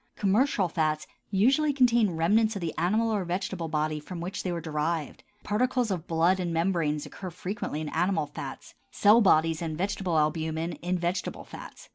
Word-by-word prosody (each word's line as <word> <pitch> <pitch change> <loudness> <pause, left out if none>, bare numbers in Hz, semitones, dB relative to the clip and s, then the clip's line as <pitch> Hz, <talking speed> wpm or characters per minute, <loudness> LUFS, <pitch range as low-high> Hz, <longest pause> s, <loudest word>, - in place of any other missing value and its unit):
Commercial 210 0 +2
fats 155 -2 -1 0.2
usually 265 +10 +3
contain 235 - +3
remnants 215 +7 +3
of - - -3
the 165 -2 -2
animal 215 +7 +1
or 205 -3 0
vegetable 175 -1 -3
body 155 0 -1
from 170 +4 -8
which 175 +3 -4
they 185 - -3
are 175 -1 -2
derived: 155 -1 -3 0.2
particles 245 +1 0
of 175 -3 -3
blood 170 +3 +2
and 175 -2 -2
membranes 165 -3 0
occur 185 - -7
frequently 180 -3 -4
in 155 - -4
animal 170 -1 +1
fats; - - -8 0.2
cell 215 +3 +5
bodies 165 -4 +3
and 160 -2 -3
vegetable 190 -2 -1
albumin 160 +2 0
in 180 +1 -1
vegetable 175 +1 -2
fats. - - -11
175 Hz, 170 wpm, -28 LUFS, 160-205 Hz, 0.2 s, cell